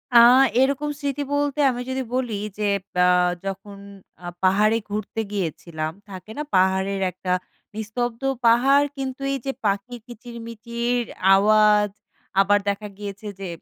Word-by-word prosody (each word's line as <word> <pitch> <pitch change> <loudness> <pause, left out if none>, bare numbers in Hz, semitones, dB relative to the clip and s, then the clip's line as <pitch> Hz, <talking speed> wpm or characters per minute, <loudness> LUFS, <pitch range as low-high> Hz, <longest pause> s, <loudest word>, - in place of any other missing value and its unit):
আ - - +10 0.4
এরকম 280 +2 +1
স্মৃতি 285 -1 -2
বলতে 285 0 0
আমি 245 - -5
যদি 265 0 -2
বলি, 250 -3 -1 0.2
যে 210 - -3 0.4
আ - - +5 0.4
যখন 195 +1 -6 0.5
আ - - -8 0.2
পাহাড়ে 210 +4 +4
ঘুরতে 215 +2 -3
গিয়েছিলাম। 165 -4 -3 0.2
থাকে 190 +2 -10
না? 300 - -2
পাহাড়ের 190 +1 +2
একটা, 180 +1 -5 0.4
নিস্তব্ধ 230 +2 -3 0.2
পাহাড় 270 +5 +5
কিন্তু 265 0 -5
এই - - -1
যে 270 - 0
পাখির 200 +4 -1
কিচির-মিচির 235 0 -4 0.3
আওয়াজ, 210 0 +4 0.5
আবার 205 +1 +3
দেখা 200 +1 -3
গিয়েছে 205 0 -7
যে, 195 - -5
215 Hz, 130 wpm, -23 LUFS, 200-245 Hz, 0.5 s, আ